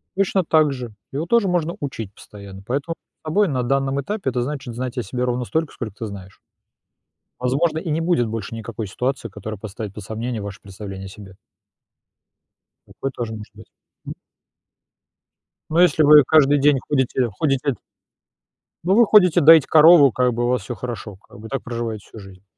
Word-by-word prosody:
Точно 195 -1 +1
так 155 -3 +3
же 125 -3 -7 0.2
его 145 +4 -3
тоже 225 +2 +2
можно 170 -2 -1
учить 115 -8 -6
постоянно, 100 -2 -12
поэтому 140 +7 -3 0.3
над 155 - -11
собой 205 +4 +3
на 130 -5 -1
данном 135 +2 0
этапе 200 -2 -3
это 125 -1 -2
значит 135 -2 -5
знать 125 +1 -5
о 125 - -1
себе 125 +5 -4
ровно 125 0 -1
столько, 160 +3 -2
сколько 110 -5 -6
ты 115 - -4
знаешь. 100 -2 -10 1.0
Возможно, 145 +6 0
и 165 - -6
не 155 +2 0
будет 165 -9 +1
больше 110 0 -5
никакой 110 -1 -6
ситуации, 125 +4 -3
которая 105 +2 -7
поставит 105 -1 -7
под 105 - -9
сомнению 110 +1 -4
ваше 100 0 -8
представление 95 -1 -9
о 95 - -8
себе. 95 -1 -13 1.5
Такое 135 - -5
тоже 115 -3 -5
может 110 -1 -10
быть, - - -15 0.3
м. - - -6 1.6
Но 165 +3 +3
если 160 -3 +4
вы 150 0 +8
каждый 145 -2 +4
день 145 0 +4
ходите 130 -3 0
ходите. 140 -2 0 1.1
Ну, 190 +3 +3
вы 235 0 +6
ходите 180 -5 +5
доить 160 -1 +7
корову, 155 -3 +7
как 125 +1 +1
бы 120 +1 -2
у - - +1
вас 125 -3 +1
всё 120 - -6
хорошо, 115 -4 -7
как 100 - -17
бы 110 - -9
так 135 +2 -4
проживаете 115 -3 -5
всю 110 - -12
жизнь. 95 -1 -14
125 Hz, 180 wpm, -21 LUFS, 110-155 Hz, 1.6 s, вы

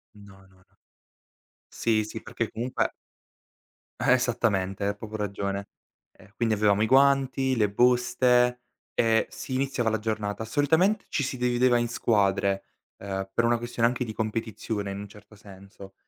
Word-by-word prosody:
No, 100 -1 -15
no, 95 0 -25
no. 95 - -30 0.9
Sì, 110 -2 +1
sì, 110 +1 -7
perché 115 - -4
comunque 120 +3 -2 1.1
Esattamente, 105 -6 +1
hai 100 - -1
proprio 110 0 -7
ragione. 100 0 -3 0.4
Eh, 100 - -20
quindi 115 -2 +1
avevamo 105 0 +2
i 110 - +2
guanti, 135 0 +3
le 105 -3 +2
buste 125 +1 +3 0.3
e 115 -1 +2
si 130 - -7
iniziava 130 -3 0
la 110 -1 -1
giornata. 110 -1 -3
Solitamente 160 - +2
ci 145 - -1
si 130 0 -3
divideva 125 0 +2
in 120 0 0
squadre, 100 -4 +1 0.3
ehm, 95 -1 -5
per 115 - +2
una 120 0 +3
questione 120 0 0
anche 125 +1 -1
di 110 -3 -6
competizione 110 -2 -3
in 100 - -5
un 100 - -7
certo 105 +1 -17
senso. 100 -1 -14
110 Hz, 150 wpm, -26 LUFS, 100-125 Hz, 1.1 s, guanti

